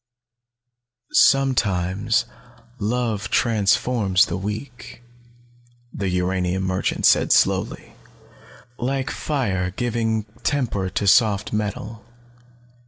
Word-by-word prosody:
"Sometimes 100 -9 +2 0.5
love 110 -1 -2
transforms 105 -3 +2
the 85 - -4
weak," 110 +6 -7 0.9
the 100 -2 -2
uranium 90 +1 -1
merchant 95 0 -1
said - - +4
slowly. - - +1 0.9
"Like 135 +3 -2
fire 100 -12 -2
giving 110 +1 -1 0.2
temper 115 -9 -1
to 100 - -2
soft 105 0 +3
metal. 105 +1 -4
105 Hz, 80 wpm, -22 LUFS, 95-120 Hz, 0.9 s, said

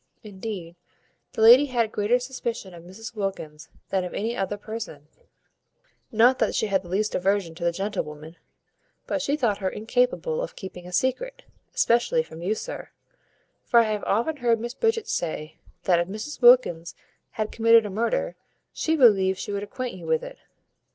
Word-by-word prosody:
Indeed, 190 -4 -7 0.6
the 220 - 0
lady 250 +6 +8
had 240 -3 +1
a - - -7
greater 215 +3 +1
suspicion 240 -6 -5
of 170 -1 -12
Mrs 200 +7 -10
Wilkins 175 -7 -5 0.2
than 190 -1 0
of 180 - -6
any 225 +3 -2
other 195 +1 -2
person; 205 -9 -7 1.0
not 240 +4 +4
that - - +1
she - - +1
had 195 -2 +1
the 180 - -13
least 210 +4 0
aversion 190 -2 0
to 170 +1 -8
the 170 - +2
gentlewoman, 165 -4 -5 0.7
but - - -2
she 285 +2 0
thought 220 -8 0
her 190 -2 -1
incapable 250 - 0
of - - -5
keeping 180 -2 -9
a - - -9
secret, - - -1 0.3
especially 240 - +2
from 165 - -11
you, 195 +5 0
sir; - - -7 0.7
for 235 - +4
I 225 -2 +2
have 210 -1 -2
often 235 +10 0
heard 235 -3 +2
Miss 240 +2 -5
Bridget 450 - 0
say, 155 -2 -3 0.3
that, 175 -2 +3
if 170 - 0
Mrs 215 +11 -7
Wilkins 215 -9 +5 0.4
had 215 -1 -3
committed 230 -1 +5
a 205 - -4
murder, - - -1 0.4
she 320 - 0
believed 195 -9 +5
she 185 - -5
would 200 0 -2
acquaint 245 +4 -5
you 170 -3 -10
with 160 0 +1
it. - - -9
215 Hz, 180 wpm, -25 LUFS, 185-245 Hz, 1.0 s, lady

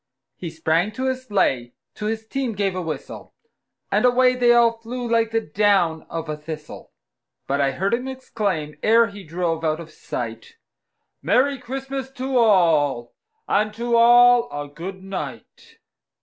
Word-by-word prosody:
He 170 - -6
sprang 160 +4 0
to 260 +4 -3
his 260 0 -2
sleigh, 125 - 0 0.2
to 210 - -5
his 220 0 -3
team 260 0 -3
gave 195 -2 -1
a 185 - -2
whistle, 155 -5 -7 0.6
And - - +2
away 250 0 +4
they 245 -1 +3
all 235 -1 +4
flew 240 +2 -5
like 230 -1 +2
the 225 0 +1
down 180 -3 +1
of 165 -1 -5
a 155 - -3
thistle; 150 0 -9 0.5
But 140 +1 0
I 135 -1 +1
heard 195 - -1
him 250 +2 -1
exclaim, 200 - -3
ere 230 +2 +5
he 200 0 -10
drove 165 -1 -2
out 155 0 0
of 165 -1 -10
sight, 465 - -6 0.7
"Merry 275 +1 +2
Christmas 265 +1 -5
to 265 0 -4
all, 165 - +3 0.3
and 215 +1 +1
to 235 +1 0
all 240 +1 +6
a 145 0 -5
good 185 +6 -8
night!" 460 - -8
210 Hz, 160 wpm, -22 LUFS, 160-245 Hz, 0.7 s, all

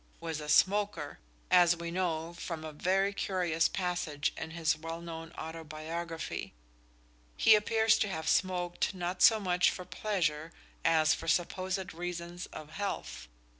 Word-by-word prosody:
_ - - -33 0.2
was 160 -2 -4
a 150 - -6
smoker, 195 -5 +2 0.3
as 175 -1 +6
we 170 0 -5
know 170 -2 -1
from 165 -2 -6
a 155 - -7
very 195 +6 +1
curious 175 -5 +1
passage 175 -6 -2
in 160 - -5
his 160 -1 +1
well 165 +1 -6
known 165 -1 -7
autobiography. 160 +1 -5 0.8
He 220 - +7
appears 220 +1 +4
to 215 - +2
have 160 -5 -4
smoked 180 +1 +1
not 180 0 -3
so 220 -1 +7
much 180 -3 +3
for 180 - -6
pleasure 165 -6 -1 0.3
as 160 -2 +4
for 165 - -6
supposed 185 +3 -1
reasons 175 +1 -5
of 155 0 -10
health. 200 - -4
170 Hz, 145 wpm, -31 LUFS, 160-185 Hz, 0.8 s, He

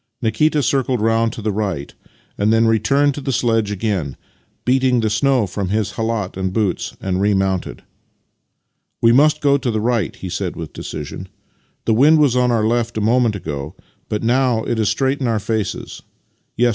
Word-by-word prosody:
Nikita 145 +6 +1
circled 130 0 +1
round 115 +1 +2
to 110 - -8
the 110 - 0
right, 95 -9 -3 0.4
and 105 +1 +1
then 115 +1 +4
returned 140 +6 +2
to 145 - -6
tlie 135 -1 -2
sledge 115 -3 +1
again, 100 -8 -2 0.5
beat 130 +1 +3 0.2
the 110 -2 0
snow 125 +1 +2
from 95 0 -4
his 105 +1 0
khalat 110 -4 -3
and 95 0 -2
boots, 100 -3 -2
and 95 0 -2
remounted. 95 -2 0 0.6
" - - -54
We 115 - +6
must 150 +5 +4
go 140 -1 +4
to 125 - -2
the 110 -2 0
right," 115 0 0
he 95 - -7
said 90 0 -3
with 80 -3 -7
decision. - - -7 0.3
" - - -42
The 115 - +2
wind 145 +8 +5
was 145 -5 +3
on 125 0 +3
our 115 -3 +1
left 120 0 0
a - - +1
moment 115 +1 +2
ago, 75 -3 -6 0.3
but 105 +1 -2
now 120 -1 +2
it 115 - -2
is 110 - +2
straight 135 +1 0
in 130 - 0
our 115 -1 +1
faces. 110 -1 -3
110 Hz, 185 wpm, -19 LUFS, 100-125 Hz, 0.6 s, We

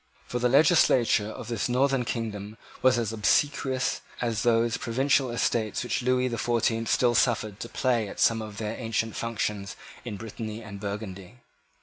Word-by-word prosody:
For 125 - -3
the 125 +1 +2
legislature 130 -7 +4
of 110 - -8
his 115 0 -1
northern 130 0 +2
kingdom 110 -3 -4 0.2
was 130 -1 +4
as 115 -2 -1
obsequious 130 +3 +1 0.2
as 115 -3 -1
those 115 -1 +2
provincial 130 +2 +1
Estates 115 -2 0
which 125 - -1
Lewis 125 0 +1
the 115 - -3
Fourteenth 115 -1 0
still 120 -1 +3
suffered 110 -4 +1
to 115 - -6
play 120 -5 0
at - - -9
some 115 -1 +3
of 105 -1 -8
their 110 0 -3
ancient 115 -2 -2
functions 105 -3 -3 0.3
in 110 -4 -5
Britanny 110 +1 -6
and 100 -1 -9
Burgundy. 100 0 -6
115 Hz, 160 wpm, -27 LUFS, 110-125 Hz, 0.3 s, legislature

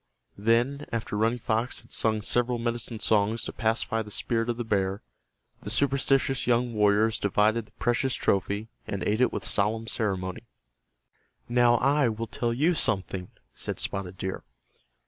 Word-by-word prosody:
Then, 120 +7 +1
after 115 -2 -3
Running 115 +3 +1
Fox 115 +1 -1
had - - -21
sung 110 -2 +1
several 120 +2 +2
medicine 120 -1 -3
songs 110 +2 +1
to - - -5
pacify 115 0 0
the 105 - -8
spirit 115 +2 -1
of 120 - -1
the 120 - -2
bear, 100 -2 -1 0.6
the 105 - -6
superstitious 135 +1 +2
young 120 0 +2
warriors 105 +1 +3
divided 105 +2 +2
the - - -24
precious 125 +4 0
trophy 100 +2 0 0.2
and 100 - -3
ate 110 +4 +1
it 125 - +4
with - - -4
solemn 110 +3 +1
ceremony. 105 0 -2 1.0
"Now 120 0 +4
I 140 +1 +3
will 115 +1 -3
tell 120 +1 -2
you 150 +9 +2
something," 95 - 0 0.2
said - - -5
Spotted 95 -1 -4
Deer. 95 +1 -4
115 Hz, 155 wpm, -27 LUFS, 105-120 Hz, 1.0 s, it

